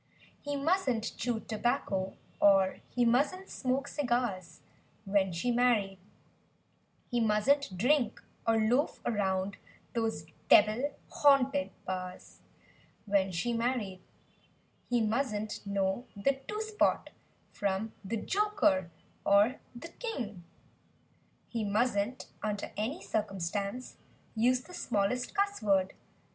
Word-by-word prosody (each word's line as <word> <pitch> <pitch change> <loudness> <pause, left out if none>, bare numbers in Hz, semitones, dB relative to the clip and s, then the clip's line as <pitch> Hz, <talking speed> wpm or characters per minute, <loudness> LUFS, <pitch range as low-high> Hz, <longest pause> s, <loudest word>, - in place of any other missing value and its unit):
He 290 0 -3
musn't 275 - 0
chew 235 -2 -1
tobacco 200 -4 -1 0.2
or 195 -2 +5
he 245 -1 +1
musn't 290 +11 +1
smoke 270 +1 -1
cigars— 240 - -2 0.4
When 195 -1 +2
she 175 +9 -1
married; 230 -6 +2 1.1
He 240 - +1
musn't 220 +1 +2
drink, 250 +4 +2 0.3
or 225 0 +4
loaf 240 +7 +2
around 195 -3 0 0.4
those 225 -9 -1 0.2
"devil 235 +8 +5 0.2
haunted" 280 0 +4 0.2
bars— 185 -1 -6 0.6
When 195 -2 +2
she 235 +8 -1
married; 230 -6 -1 0.9
He 240 -1 +2
musn't 220 -1 -1
know 200 +4 -1
the 270 +7 0
"two 425 +1 -3
spot" 435 -1 +1 0.4
from 200 +2 -2
the 215 +4 -2
"joker" 375 - +1 0.3
or 205 +6 +4 0.2
the 335 +8 -8
"king;" 240 - -5 1.0
He 230 -2 -3
musn't, 210 +2 0 0.2
under 210 -1 -3
any 245 - -3
circumstance 200 +3 -3 0.4
Use 245 +3 +3
the 360 - -14
smallest 245 - -1
cussword. 215 - +2
225 Hz, 105 wpm, -31 LUFS, 200-255 Hz, 1.1 s, or